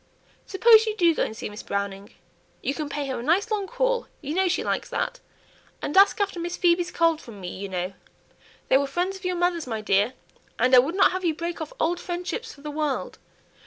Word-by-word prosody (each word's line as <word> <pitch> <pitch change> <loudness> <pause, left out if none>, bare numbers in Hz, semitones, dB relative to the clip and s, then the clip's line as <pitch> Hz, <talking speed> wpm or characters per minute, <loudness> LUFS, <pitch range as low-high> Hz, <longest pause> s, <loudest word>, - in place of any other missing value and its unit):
Suppose 445 +3 +6
you 430 - -1
do 340 -4 +4
go - - -2
and 220 - -5
see - - -4
Miss 210 0 -8
Browning; 200 0 -4 0.5
you 275 - 0
can 300 -1 -4
pay 290 -1 -3
her 265 -2 -3
a - - -4
nice 360 - +1
long 405 -2 -1
call, - - 0
you 295 0 -5
know 380 +2 +2
she 360 - 0
likes - - -2
that; - - -2 0.6
and 290 - -4
ask 395 +2 +6
after 395 -3 -1
Miss 345 +1 -4
Phoebe's 350 0 +2
cold 330 -2 +2
from 220 -4 -11
me, 180 -2 -6
you 195 +1 -6
know. 185 0 -3 0.8
They 265 - +6
were 280 - -1
friends 355 +7 -1
of 380 - -11
your 365 0 0
mother's, 350 -4 0
my 225 -3 -3
dear, 205 +3 +2 0.4
and 250 +3 +2
I - - +10
would 290 +8 +1
not 390 - +5
have 370 +1 -3
you 330 -3 +1
break 335 +1 -4
off 310 - -5
old 345 +2 +1
friendships 360 +7 -4
for 280 - -15
the 300 +1 -6
world. 300 -2 -2
335 Hz, 230 wpm, -25 LUFS, 260-370 Hz, 0.8 s, I